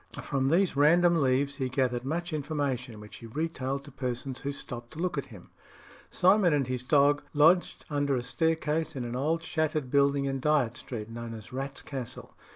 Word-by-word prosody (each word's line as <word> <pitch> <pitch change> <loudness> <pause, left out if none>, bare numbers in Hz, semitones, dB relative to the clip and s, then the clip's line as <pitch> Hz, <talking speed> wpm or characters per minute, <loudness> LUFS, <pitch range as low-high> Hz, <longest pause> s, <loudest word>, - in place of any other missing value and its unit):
From 135 -1 0
these 180 +2 +2
random 170 +3 +5
leaves 140 +1 +1
he 130 -2 -1
gathered 125 -2 0
much 170 +5 -3
information, 140 -6 -2
which 105 0 -11
he 115 - -10
retailed 140 0 -3
to 145 - -12
persons 130 0 -4
who 140 - -3
stopped 120 -3 -8
to - - -12
look 180 -2 -1
at 140 - -2
him. 100 -7 -14 0.6
Simon 185 -3 +4
and 140 -2 +1
his 125 0 -3
dog 145 +2 +3
lodged 165 +5 +4
under 145 -2 0
a 125 - -2
staircase 160 +5 0
in 125 -2 -3
an 120 +1 -4
old 160 +6 0
shattered 155 -4 -1
building 140 0 +3
in 135 -1 -1
Dyot 140 -5 +2
Street, 110 -4 -6
known 115 0 -6
as 110 +2 -11
"Rat's 135 +1 -5
Castle." 125 -4 -7
140 Hz, 185 wpm, -29 LUFS, 125-155 Hz, 0.6 s, random